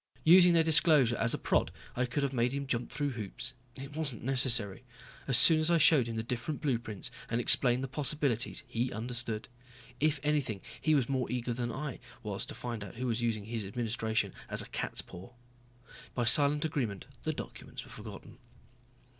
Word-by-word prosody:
Using 175 Hz, +1 st, +7 dB
their 165 Hz, -1 st, +4 dB
disclosure 150 Hz, -6 st, +4 dB
as 115 Hz, -, +1 dB
a -, -, -3 dB
prod -, -, +1 dB, 0.2 s
I 125 Hz, -, +1 dB
could 140 Hz, +4 st, -2 dB
have 140 Hz, -1 st, -1 dB
made 120 Hz, 0 st, +1 dB
him 140 Hz, 0 st, -3 dB
jump 120 Hz, -2 st, -2 dB
through 145 Hz, +2 st, -2 dB
hoops. 110 Hz, -6 st, -5 dB, 0.2 s
It 135 Hz, +2 st, -9 dB
wasn't 145 Hz, -7 st, -3 dB
necessary. 125 Hz, -5 st, 0 dB, 0.4 s
As 135 Hz, -, +5 dB
soon 160 Hz, -2 st, +8 dB
as 155 Hz, +1 st, +1 dB
I 170 Hz, -, +4 dB
showed 145 Hz, -6 st, +5 dB
him 115 Hz, -, -4 dB
the 110 Hz, -, -2 dB
different 125 Hz, +5 st, -4 dB
blueprints 115 Hz, -7 st, -2 dB, 0.2 s
and 115 Hz, -, 0 dB
explained 125 Hz, +1 st, +5 dB
the -, -, -2 dB
possibilities 140 Hz, -2 st, -1 dB
he 125 Hz, 0 st, -2 dB
understood. 115 Hz, -1 st, -3 dB, 0.5 s
If 150 Hz, 0 st, +1 dB
anything, 140 Hz, -9 st, 0 dB, 0.2 s
he 155 Hz, -1 st, +3 dB
was 130 Hz, -5 st, +2 dB
more 130 Hz, -2 st, -1 dB
eager 125 Hz, -1 st, -2 dB
than 120 Hz, 0 st, -3 dB
I 135 Hz, +1 st, -5 dB, 0.2 s
was -, -, -4 dB
to -, -, -7 dB
find 120 Hz, -3 st, -5 dB
out 100 Hz, -, -10 dB
who 125 Hz, +3 st, -4 dB
was 120 Hz, -1 st, -1 dB
using 115 Hz, -3 st, -1 dB
his 115 Hz, -1 st, -4 dB
administration 110 Hz, +1 st, -2 dB, 0.2 s
as -, -, -2 dB
a -, -, -13 dB
cat's -, -, -3 dB
paw. 95 Hz, +8 st, -12 dB, 0.8 s
By 125 Hz, -, 0 dB
silent 145 Hz, +5 st, +4 dB
agreement 120 Hz, -11 st, -2 dB, 0.2 s
the -, -, -1 dB
documents -, -, -8 dB
were -, -, -15 dB
forgotten. -, -, -10 dB
125 Hz, 190 wpm, -31 LUFS, 115-145 Hz, 0.8 s, soon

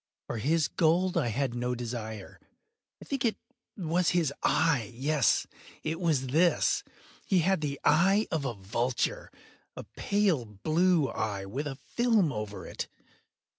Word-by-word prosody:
For 115 Hz, -, -4 dB
his 155 Hz, +5 st, +2 dB
gold 175 Hz, +2 st, +2 dB
I -, -, +2 dB
had 130 Hz, +2 st, -1 dB
no 125 Hz, +1 st, -1 dB
desire. 110 Hz, -4 st, -6 dB, 0.6 s
I -, -, -12 dB
think 275 Hz, -3 st, -2 dB
it 230 Hz, -3 st, +1 dB, 0.4 s
was 175 Hz, -1 st, +1 dB
his 165 Hz, -6 st, +1 dB
eye! 150 Hz, -9 st, +2 dB
yes, 140 Hz, +1 st, +2 dB, 0.4 s
it 160 Hz, +1 st, -2 dB
was 155 Hz, -7 st, +1 dB
this! 165 Hz, +6 st, +3 dB, 0.4 s
He 185 Hz, -3 st, +3 dB
had 190 Hz, 0 st, +2 dB
the 140 Hz, -2 st, -3 dB
eye 195 Hz, +6 st, +4 dB
of 160 Hz, -3 st, 0 dB
a 125 Hz, -4 st, -2 dB
vulture—a 115 Hz, +6 st, -4 dB
pale 195 Hz, -, +1 dB
blue 155 Hz, -, +2 dB
eye, 100 Hz, -4 st, -3 dB
with 135 Hz, +10 st, -4 dB
a 135 Hz, -, -4 dB
film 215 Hz, -, +1 dB
over 105 Hz, -1 st, -5 dB
it. -, -, -5 dB
150 Hz, 140 wpm, -29 LUFS, 120-175 Hz, 0.6 s, eye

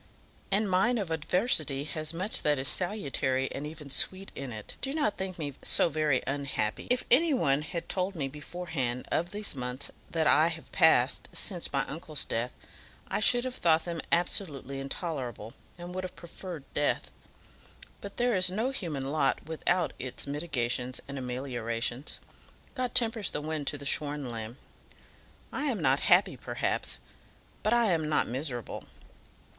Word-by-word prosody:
"And 205 Hz, +2 st, +2 dB
mine 200 Hz, +7 st, +3 dB
of 195 Hz, -6 st, -2 dB
adversity 160 Hz, -, +2 dB
has 155 Hz, +1 st, -2 dB
much 185 Hz, +6 st, +1 dB
that 150 Hz, -1 st, +2 dB
is 130 Hz, +1 st, +1 dB
salutary 140 Hz, -9 st, 0 dB
and 145 Hz, +2 st, -4 dB
even 150 Hz, -2 st, -9 dB
sweet 190 Hz, +7 st, +1 dB
in 135 Hz, -2 st, -5 dB
it. 110 Hz, -2 st, -7 dB
Do 270 Hz, -, -2 dB
not 290 Hz, -9 st, +1 dB
think 190 Hz, -1 st, -4 dB
me 145 Hz, -4 st, -3 dB
so -, -, +6 dB
very 150 Hz, -4 st, +1 dB
unhappy. 135 Hz, -6 st, -1 dB
If 250 Hz, +1 st, +3 dB
any 300 Hz, +4 st, +6 dB
one 140 Hz, -, +4 dB
had 170 Hz, +2 st, -4 dB
told 190 Hz, +1 st, 0 dB
me 140 Hz, -5 st, -1 dB
beforehand 145 Hz, -4 st, -3 dB
of 175 Hz, -, +1 dB
these 205 Hz, +2 st, -1 dB
months 125 Hz, +1 st, -2 dB, 0.2 s
that 160 Hz, -1 st, 0 dB
I 155 Hz, +1 st, +6 dB
have 165 Hz, -1 st, -6 dB
passed 150 Hz, -7 st, +4 dB
since 180 Hz, -5 st, -1 dB
my 135 Hz, -1 st, +1 dB
uncle's 155 Hz, -1 st, -1 dB
death, 115 Hz, +2 st, -2 dB, 0.5 s
I -, -, 0 dB
should 240 Hz, +3 st, +5 dB
have 255 Hz, -, -2 dB
thought 165 Hz, -8 st, +3 dB
them 170 Hz, -2 st, -3 dB
absolutely 150 Hz, -6 st, +1 dB
intolerable, 135 Hz, -, -4 dB, 0.2 s
and 175 Hz, 0 st, -7 dB
would 185 Hz, 0 st, -3 dB
have 185 Hz, -, -6 dB
preferred 170 Hz, -2 st, -8 dB
death. 145 Hz, 0 st, 0 dB, 0.9 s
But 200 Hz, -, -8 dB
there 245 Hz, -2 st, +3 dB
is 185 Hz, -1 st, +4 dB
no 220 Hz, +8 st, 0 dB
human 150 Hz, -, -3 dB
lot 145 Hz, -3 st, +1 dB
without 170 Hz, +3 st, 0 dB
its 125 Hz, -1 st, -2 dB
mitigations 130 Hz, -4 st, -1 dB
and 140 Hz, 0 st, -5 dB
ameliorations. 125 Hz, 0 st, -3 dB, 0.5 s
God 255 Hz, -3 st, -2 dB
tempers 225 Hz, -4 st, +2 dB
the -, -, -3 dB
wind 150 Hz, -1 st, -3 dB
to 145 Hz, -, -1 dB
the 140 Hz, -, -10 dB
shorn 145 Hz, -2 st, 0 dB
lamb. 115 Hz, +1 st, -5 dB, 0.9 s
I -, -, -2 dB
am -, -, 0 dB
not -, -, +3 dB
happy, -, -, +4 dB
perhaps; -, -, -1 dB, 0.6 s
but 215 Hz, -, +1 dB
I 235 Hz, -4 st, +4 dB
am 160 Hz, -3 st, +1 dB
not 150 Hz, -, +3 dB
miserable. 125 Hz, -1 st, -3 dB
155 Hz, 160 wpm, -30 LUFS, 135-185 Hz, 0.9 s, so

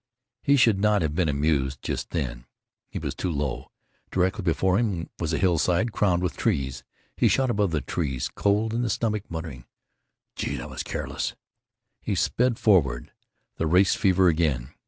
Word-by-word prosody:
He 140 Hz, -, +4 dB
should 115 Hz, -6 st, +4 dB
not 105 Hz, -2 st, +3 dB
have 75 Hz, -2 st, -1 dB
been 85 Hz, 0 st, +1 dB
amused 70 Hz, -2 st, 0 dB
just -, -, -3 dB
then. -, -, -3 dB, 0.4 s
He -, -, -6 dB
was -, -, -3 dB
too 90 Hz, -, -3 dB
low. 70 Hz, -5 st, -3 dB, 0.4 s
Directly 95 Hz, +2 st, 0 dB
before 95 Hz, +2 st, +2 dB
him 95 Hz, -9 st, -2 dB
was 80 Hz, -2 st, -1 dB
a 80 Hz, -, 0 dB
hillside 90 Hz, +4 st, +2 dB
crowned 90 Hz, -4 st, +1 dB
with 90 Hz, -, -1 dB
trees. 70 Hz, -, -1 dB, 0.3 s
He -, -, +3 dB
shot 130 Hz, -2 st, +2 dB
above 100 Hz, -3 st, +1 dB
the 80 Hz, -3 st, -1 dB
trees, 70 Hz, -7 st, -2 dB
cold 105 Hz, +2 st, 0 dB
in 120 Hz, -, 0 dB
the 120 Hz, -, -1 dB
stomach, 105 Hz, -1 st, -1 dB
muttering, 80 Hz, -7 st, -6 dB, 0.7 s
"Gee! -, -, -3 dB
that -, -, -7 dB
was -, -, -4 dB
careless!" -, -, -4 dB, 0.7 s
He -, -, -2 dB
sped 125 Hz, -1 st, +1 dB
forward. 70 Hz, -, +2 dB, 0.5 s
The 80 Hz, -, 0 dB
race 90 Hz, +4 st, +4 dB
fever 95 Hz, -1 st, +3 dB
again. 75 Hz, -7 st, +1 dB
90 Hz, 170 wpm, -25 LUFS, 75-105 Hz, 0.7 s, He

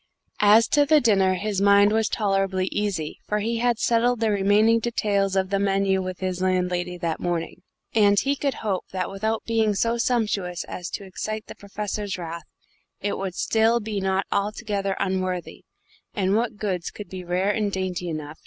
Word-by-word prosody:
As 215 Hz, +3 st, +6 dB
to 290 Hz, -, +4 dB
the 305 Hz, +1 st, +5 dB
dinner, 195 Hz, -6 st, +3 dB
his 200 Hz, 0 st, -2 dB
mind 200 Hz, +1 st, +5 dB
was 220 Hz, 0 st, +1 dB
tolerably 195 Hz, -3 st, 0 dB
easy, 200 Hz, -7 st, -2 dB
for 210 Hz, -, 0 dB
he 225 Hz, +2 st, -1 dB
had 240 Hz, -1 st, +2 dB
settled 235 Hz, +1 st, +2 dB
the 225 Hz, -2 st, +1 dB
remaining 205 Hz, +3 st, +4 dB
details 200 Hz, -4 st, 0 dB
of 190 Hz, 0 st, 0 dB
the 195 Hz, -, +1 dB
menu 195 Hz, -1 st, +1 dB
with 185 Hz, 0 st, -6 dB
his 185 Hz, -1 st, -2 dB
landlady 180 Hz, -1 st, 0 dB
that 170 Hz, -2 st, -2 dB
morning, 170 Hz, -1 st, -3 dB, 0.3 s
and 205 Hz, -2 st, +5 dB
he 280 Hz, +1 st, 0 dB
could 280 Hz, -1 st, -1 dB
hope 195 Hz, -3 st, -1 dB
that 185 Hz, -1 st, -3 dB
without 220 Hz, +3 st, -2 dB
being 220 Hz, -2 st, +1 dB
so 230 Hz, +3 st, 0 dB
sumptuous 210 Hz, -8 st, 0 dB
as 180 Hz, -, -6 dB
to -, -, -5 dB
excite 215 Hz, +3 st, -5 dB
the -, -, -9 dB
Professor's 205 Hz, -1 st, -4 dB
wrath, 170 Hz, -2 st, -6 dB, 0.5 s
it 205 Hz, -, -2 dB
would 190 Hz, -2 st, -4 dB
still 225 Hz, +1 st, +2 dB
be 210 Hz, -2 st, -3 dB
not 190 Hz, 0 st, 0 dB
altogether 200 Hz, -1 st, -1 dB
unworthy 185 Hz, -2 st, -2 dB, 0.5 s
and 195 Hz, -1 st, +1 dB
what 230 Hz, -1 st, 0 dB
goods 185 Hz, -5 st, -2 dB
could 210 Hz, -, -9 dB
be 185 Hz, -1 st, -7 dB
rare 180 Hz, +3 st, 0 dB
and 210 Hz, -1 st, -1 dB
dainty 185 Hz, -2 st, -3 dB
enough? 155 Hz, -1 st, -6 dB
200 Hz, 180 wpm, -24 LUFS, 185-215 Hz, 0.5 s, As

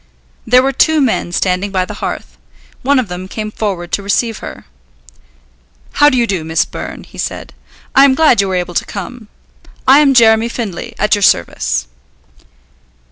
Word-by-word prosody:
There 250 Hz, +2 st, +5 dB
were 270 Hz, -, +1 dB
two 315 Hz, +4 st, +2 dB
men 245 Hz, -9 st, 0 dB
standing 185 Hz, +2 st, 0 dB
by 185 Hz, -1 st, 0 dB
the -, -, -8 dB
hearth. -, -, -5 dB, 0.5 s
One 280 Hz, +2 st, +2 dB
of 255 Hz, -4 st, 0 dB
them 180 Hz, +1 st, -7 dB
came 215 Hz, +2 st, -5 dB
forward 190 Hz, -6 st, -4 dB
to -, -, -1 dB
receive 215 Hz, +3 st, -1 dB
her. -, -, -9 dB, 1.3 s
"How 290 Hz, -, +5 dB
do 260 Hz, -, 0 dB
you 240 Hz, -, +3 dB
do, 190 Hz, -7 st, -2 dB
Miss 160 Hz, 0 st, 0 dB
Byrne," -, -, -8 dB
he -, -, -14 dB
said; -, -, -5 dB, 0.4 s
"I 270 Hz, -, +6 dB
am 265 Hz, -2 st, +3 dB
glad 295 Hz, -8 st, +4 dB
you 200 Hz, -, -1 dB
were 190 Hz, -, -2 dB
able 180 Hz, -1 st, -3 dB
to -, -, -1 dB
come. 220 Hz, +3 st, -8 dB, 0.6 s
I 270 Hz, +2 st, +7 dB
am 280 Hz, -3 st, +4 dB
Jeremy 225 Hz, -1 st, +5 dB
Findlay, 225 Hz, -7 st, -6 dB
at 210 Hz, -, +1 dB
your 205 Hz, -, +1 dB
service." 85 Hz, -, +1 dB
215 Hz, 180 wpm, -15 LUFS, 185-255 Hz, 1.3 s, I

